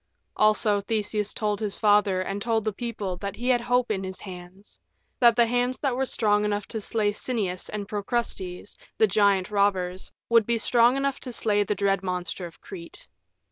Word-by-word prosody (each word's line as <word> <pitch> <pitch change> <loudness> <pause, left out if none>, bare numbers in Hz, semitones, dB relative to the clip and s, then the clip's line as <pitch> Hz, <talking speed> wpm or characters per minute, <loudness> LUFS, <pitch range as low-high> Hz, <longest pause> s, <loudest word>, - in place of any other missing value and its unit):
Also 215 -1 +3
Theseus 210 0 -1
told 210 -2 -2
his 210 -3 -3
father 205 -3 +3
and 195 +2 -4
told 225 0 0
the 215 - -1
people 210 -5 -4
that 200 +2 -5
he 245 +2 -3
had 245 -2 +3
hope 245 0 +1
in 195 -2 -2
his 190 0 -6
hands 185 +1 -11 0.4
that 235 -2 +6
the 235 0 +5
hands 245 +2 0
that 270 -4 -1
were 265 +1 -1
strong 210 -3 +2
enough 205 -1 -2
to 220 - -4
slay 210 0 0
Sinnias 205 -5 -3
and 205 -1 -5
Procrustes, 205 -3 -4 0.2
the 220 - +5
giant 200 -1 +2
robbers, 190 -3 0 0.2
would 230 -2 +4
be 235 0 +1
strong 240 +3 +4
enough 275 0 -1
to 255 - -6
slay 210 -3 +2
the 205 +1 -2
dread 195 -1 +1
monster 180 -1 -4
of 165 - -17
Crete. 170 -3 -10
210 Hz, 185 wpm, -25 LUFS, 195-230 Hz, 0.4 s, that